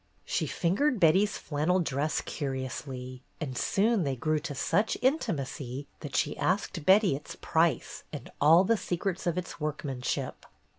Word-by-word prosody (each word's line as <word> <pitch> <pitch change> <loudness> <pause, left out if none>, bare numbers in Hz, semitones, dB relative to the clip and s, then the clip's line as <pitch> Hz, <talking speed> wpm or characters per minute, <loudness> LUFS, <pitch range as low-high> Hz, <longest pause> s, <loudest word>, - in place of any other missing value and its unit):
She - - -1
fingered 220 - +1
Betty's 190 +5 +4
flannel 160 +5 0
dress 150 -2 0
curiously, 130 -2 -5 0.2
and 135 -5 -4
soon 210 - +2
they 140 -5 0
grew 155 +4 0
to 150 -2 -5
such 195 +10 +1
intimacy 145 - -1
that 145 -3 -7
she - - +1
asked 185 -4 -1
Betty 195 -5 +6
its 145 - -8
price 165 0 0
and - - -8
all 160 +5 +7
the 230 +3 +2
secrets 185 0 -2
of 175 0 0
its 180 -2 -5
workmanship. 145 -4 -3
160 Hz, 145 wpm, -29 LUFS, 140-190 Hz, 0.2 s, all